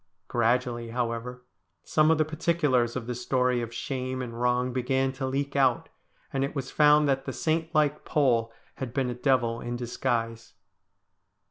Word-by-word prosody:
Gradually, 120 0 0
however, 120 +1 -3 0.4
some 155 0 +3
of 160 - +4
the 155 - +2
particulars 155 -7 +1
of 130 -3 -3
the 125 - -3
story 125 0 0
of 115 -1 -5
shame 130 +1 -3
and 120 -2 -6
wrong 125 0 +1
began 130 +1 0
to 130 0 -4
leak 140 +1 -2
out, 130 -3 +2 0.4
and 135 0 0
it 140 - -3
was 135 -2 -4
found 150 0 +5
that 135 -1 0
the - - -4
saint 160 0 -1
like 150 -2 +2
Pole 120 -6 +1 0.3
had 125 -3 -6
been 130 -3 0
a - - -2
devil 120 -2 +1
in 120 0 -4
disguise. 120 -1 -3
125 Hz, 165 wpm, -27 LUFS, 120-140 Hz, 0.4 s, found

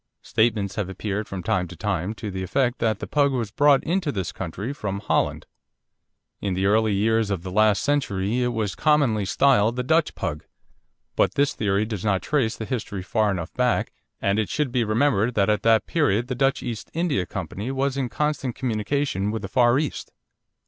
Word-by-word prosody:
Statements 110 -3 0
have 100 -3 -2
appeared 105 +2 -3
from 95 -2 -6
time 90 +1 0
to 90 - -10
time 100 +2 -2
to 105 -1 -6
the 95 0 -4
effect 125 +7 0
that 110 -3 +1
the - - -6
Pug 145 -2 +2
was 115 -5 -2
brought 140 +3 +4
into 175 -2 0
this 95 -7 -3
country 95 - -5
from 105 -8 -4
Holland. - - 0 0.9
In 100 -2 -2
the 95 +1 0
early 110 +2 +3
years 110 +1 +2
of 95 -4 -2
the 95 - -6
last 105 0 +3
century 120 -6 0
it 125 - +2
was 110 -5 -1
commonly 140 -9 +2
styled 120 -1 +3
the 125 - -1
Dutch 160 +4 +2
Pug. 75 - -4 0.7
But - - +2
this 140 0 +2
theory 105 0 0
does 105 -4 -5
not 100 -3 +1
trace 130 -7 0
the 110 - -5
history 105 -6 -4
far 110 +2 +1
enough 90 -3 -3
back, 125 -1 +1 0.3
and 100 +2 +1
it 110 - -1
should 150 -4 -1
be 125 -1 +1
remembered 115 0 +1
that 100 0 +3
at 105 - 0
that 115 -1 +4
period 125 -7 +1
the - - 0
Dutch 135 +2 +1
East 115 -3 -5
India 160 - 0
Company 105 +6 -5
was 135 0 -1
in 135 -3 -1
constant 145 -3 -1
communication 115 -3 -1
with 110 +1 -3
the - - -3
Far 120 -1 +3
East. 150 -1 -3
110 Hz, 195 wpm, -24 LUFS, 100-135 Hz, 0.9 s, brought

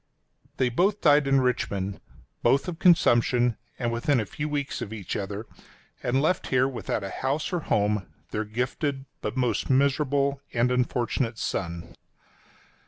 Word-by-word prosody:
They 130 - +2
both 190 - +2
died 145 -2 +5
in 135 -1 +4
Richmond 100 -6 -1 0.2
— - - -33
both 140 +5 +3
of 170 -2 -5
consumption, 120 - +4 0.2
and 120 -2 -1
within 120 +3 +1
a 110 - -1
few 150 +9 -4
weeks 145 -1 -2
of 105 - -5
each 105 -5 -5
other, 100 +2 -4 0.6
adn 130 +2 +1
left 170 +5 +1
here 130 0 +3
without 120 -5 -3
a 100 - -5
house 140 +7 -2
or 175 - +1
home 105 -7 0 0.2
their 110 - -1
gifted 135 +5 -2 0.2
but 105 +4 -4
most 125 -2 0
miserable 140 +1 +2
and 120 +1 +2
unfortunate 125 -1 0
son. 85 -5 -4
125 Hz, 155 wpm, -26 LUFS, 110-140 Hz, 0.6 s, died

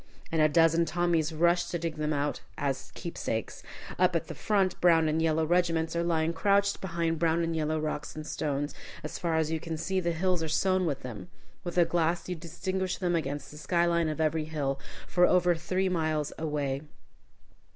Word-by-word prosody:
And 160 -1 +2
a 155 - +5
dozen 165 +2 +4
Tommies 165 -1 +1
rush 170 +2 +3
to 175 0 -3
dig 165 -1 -4
them 150 0 -1
out 145 0 -1 0.2
as 135 -2 -2
keepsakes. 115 -9 -4 0.4
Up 180 -1 +4
at 165 - -1
the - - -4
front, 190 +3 0
brown 165 -2 +5
and 155 +1 +1
yellow 160 0 +2
regiments 165 -1 +1
are 170 - +1
lying 165 -1 +1
crouched 200 +1 +2
behind 170 -3 -1
brown 165 0 +2
and 165 0 -1
yellow 155 0 0
rocks 150 -1 -3
and 155 0 -6
stones. 145 -1 -2 0.3
As 150 - -5
far 170 -2 0
as 160 -1 +1
you 160 - 0
can 165 0 -4
see, 190 +4 -1
the 170 -1 0
hills 180 +1 +1
are 160 - -1
sown 185 +3 +2
with 140 -4 -2
them. 125 +6 -8 0.3
With 175 0 -5
a 175 - +6
glass 170 0 0
you 180 - -2
distinguish 185 +3 -3
them 175 -2 0
against 145 -3 -3
the 150 - -10
sky 170 +2 +2
line 170 -2 +2
of 155 - -4
every 155 0 +1
hill, 140 -3 -2 0.3
for 180 0 +4
over 180 -1 +4
three 185 +3 -1
miles 155 -4 0
away. 145 -3 -2
165 Hz, 200 wpm, -29 LUFS, 155-175 Hz, 0.4 s, a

